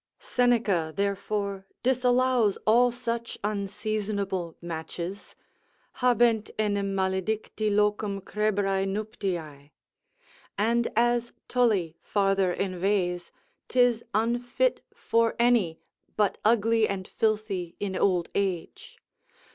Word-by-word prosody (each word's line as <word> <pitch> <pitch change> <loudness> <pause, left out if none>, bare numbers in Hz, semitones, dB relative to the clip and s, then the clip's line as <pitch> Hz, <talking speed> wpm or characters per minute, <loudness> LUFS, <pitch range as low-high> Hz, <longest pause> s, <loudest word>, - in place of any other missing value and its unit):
Seneca 225 -10 +1
therefore 200 0 -2 0.2
disallows 250 -3 +3
all 240 +3 +5
such 235 -1 -4
unseasonable 200 -3 -2
matches, 170 +3 -6 0.7
habent 240 -3 +3
enim 200 -2 0
maledicti 195 +3 -1
locum 210 -1 +1
crebrae 200 -1 0
nuptiae. 180 -8 -4 0.9
And 235 +3 +2
as 240 +1 +2
Tully 205 -10 +1
farther 195 -2 +1
inveighs, 185 -1 -1 0.4
'tis 245 -2 +3
unfit 240 - +1
for 230 0 +1
any, 235 -9 +2 0.4
but 210 -2 +1
ugly 225 0 +3
and 190 -1 -4
filthy 210 -5 -1
in 195 -2 -3
old 180 -2 +2
age. 190 -4 -3
205 Hz, 90 wpm, -27 LUFS, 190-230 Hz, 0.9 s, all